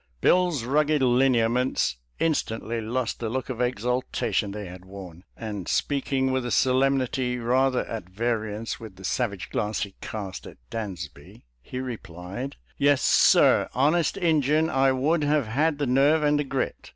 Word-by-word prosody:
" - - -40
Bill's 175 -8 +3
rugged 150 +3 +2
lineaments 125 - +2 0.2
instantly 115 -7 -1
lost 120 +2 -2
the 115 - -3
look 130 +2 -3
of 125 -2 -3
exaltation 125 -3 -1
they 105 +1 -6
had 90 0 -10
worn, 95 -3 -11
and 105 -5 -5
speaking 135 -2 0
with 130 -1 0
a 120 - -3
solemnity 130 0 +1
rather 125 +2 +1
at 110 -6 -6
variance 110 +1 -2
with 110 -4 -10
the 95 - -14
savage 100 -6 -2
glance 105 +1 -1
he 100 -2 -7
cast 100 -4 -6
at - - -12
Dansby, 95 -9 -7 0.2
he 125 - -8
replied, 110 - -6
" - - -35
Yes, 145 -1 +3
sir, - - +5
honest 150 +7 +2
Injun 160 -3 +2
I 135 0 +3
would 150 +5 +1
have 145 -2 +2
had 145 +7 +1
the 145 - -1
nerve 140 +5 +3
and 150 0 +3
the 145 - -1
grit. 135 -1 -3
125 Hz, 160 wpm, -25 LUFS, 110-135 Hz, 0.2 s, sir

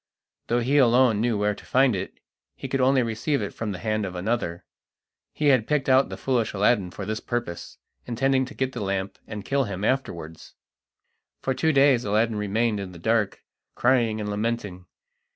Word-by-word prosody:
Though 120 +1 +1
he 140 +5 +3
alone 120 -3 +4
knew 115 -2 +1
where 105 0 +1
to - - -13
find 130 -3 +3
it, 95 +1 -6 0.4
he - - -6
could 135 0 -1
only 130 0 +4
receive 115 +6 -1
it 100 - -4
from 110 -2 -4
the 95 - -5
hand 110 +1 -1
of 95 -2 -5
another. 90 -3 -2 0.7
He 150 -1 +1
had 125 -5 +3
picked 150 -3 0
out 130 +1 +4
the - - -6
foolish 120 -4 0
Aladdin 100 -1 +2
for 95 +2 -7
this 110 +2 -3
purpose, 120 -8 -5 0.3
intending 130 +2 +1
to 140 - -11
get 130 0 -1
the 120 - -6
lamp 95 -1 -3
and 105 -2 -7
kill 140 -1 +1
him 100 -2 -5
afterwards. 85 -12 -3 0.9
For 130 - 0
two 160 +4 +1
days 135 -4 +4
Aladdin 110 +2 +1
remained 105 +1 0
in 95 -2 -6
the - - -10
dark, 105 +3 0 0.3
crying 120 -3 +2
and 105 - -3
lamenting. 105 -4 -3
115 Hz, 190 wpm, -25 LUFS, 100-130 Hz, 0.9 s, alone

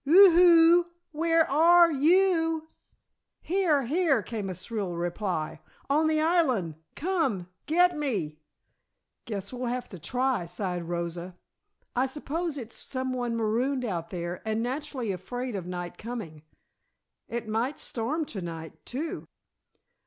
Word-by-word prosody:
"Whoo 365 +7 +8
hoo! 340 0 +7 0.3
Where 330 +1 +2
are 335 +4 +6
you!" 325 +1 +3 0.7
"Here! 340 -6 +2
Here!" 280 - +2
came 210 -3 -4
a 185 - -4
shrill 195 -1 -4
reply. 175 -1 -2 0.3
"On 310 +2 +3
the 310 0 +2
island! 295 - +2 0.2
Come 295 - -1 0.2
get 355 +2 +4
me!" 200 - -2 0.9
"Guess 200 -3 -5
we'll 250 0 -3
have 250 +1 -3
to 185 - -9
try," 250 - 0
sighed 180 -1 -4
Rosa. 170 +1 -4 0.6
"I 255 +2 +2
suppose 300 +3 -3
it's 230 -4 -6
some 260 -1 -3
one 240 -2 -2
marooned 245 +4 0
out 170 -6 -3
there 175 -1 -4
and 220 +1 -1
naturally 260 -3 -3
afraid 245 +6 -4
of 180 -3 -5
night 175 -1 -6
coming. 215 -10 -6 0.9
It 235 -1 -4
might 230 +6 -1
storm 280 +8 -2
to 200 -8 -6
night, 165 -2 -8
too." 295 +7 -4
250 Hz, 130 wpm, -28 LUFS, 190-315 Hz, 0.9 s, Whoo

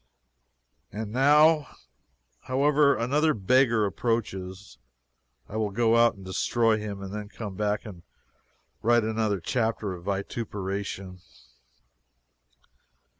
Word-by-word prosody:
And 105 0 -5
now. 150 +4 +4 0.7
However, 140 +2 +3
another 150 +6 +1
beggar 115 +1 +3
approaches. 100 - -3 0.7
I 110 - -6
will 110 -1 0
go 115 +2 +2
out 115 0 +4
and 95 -1 -13
destroy 110 +4 +1
him, 100 -2 -6
and 95 0 -7
then 105 -1 -6
come 105 -3 -7
back 105 +1 -1
and 95 -5 -10 0.8
write 120 +1 +3
another 110 -2 -1
chapter 110 0 -1
of 85 -1 -10
vituperation. 100 -2 -4
110 Hz, 105 wpm, -26 LUFS, 100-120 Hz, 0.8 s, now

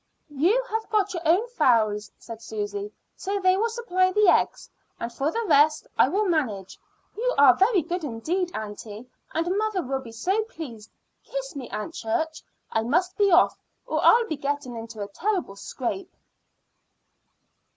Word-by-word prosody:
"You 355 - +2
have 445 0 -2
got 410 -2 +1
your 345 - -3
own 370 +9 +3
fowls," 225 - +2
said 230 -1 -10
Susy, 205 -2 -4 0.2
"so 400 +1 -3
they 370 -1 +4
will 445 +4 +1
supply 370 -6 +1
the 420 0 +4
eggs; - - +2 0.3
and 235 0 -4
for 275 +5 0
the 460 +3 -2
rest 300 -1 +4
I - - +5
will 420 +3 +1
manage. 245 - -1 0.4
You - - 0
are 280 -3 +8
very 390 -3 +3
good 350 +2 -3
indeed, 315 +9 -2
aunty, 215 +2 -7 0.2
and 340 +3 -1
mother 430 -4 0
will 270 0 -2
be 235 -3 -10
so 375 - 0
pleased. 255 - -9 0.3
Kiss - - -5
me, 265 -4 -6
Aunt 265 +10 -5
Church. 330 -2 -2 0.3
I 225 - +1
must 350 +11 0
be 405 -1 +3
off 350 0 +4 0.3
or - - -1
I'll 470 0 +6
be 315 -8 -4
getting 280 -3 -3
into 225 -2 -6
a - - -6
terrible 350 - -2
scrape." 260 - -5
325 Hz, 165 wpm, -25 LUFS, 235-390 Hz, 0.4 s, are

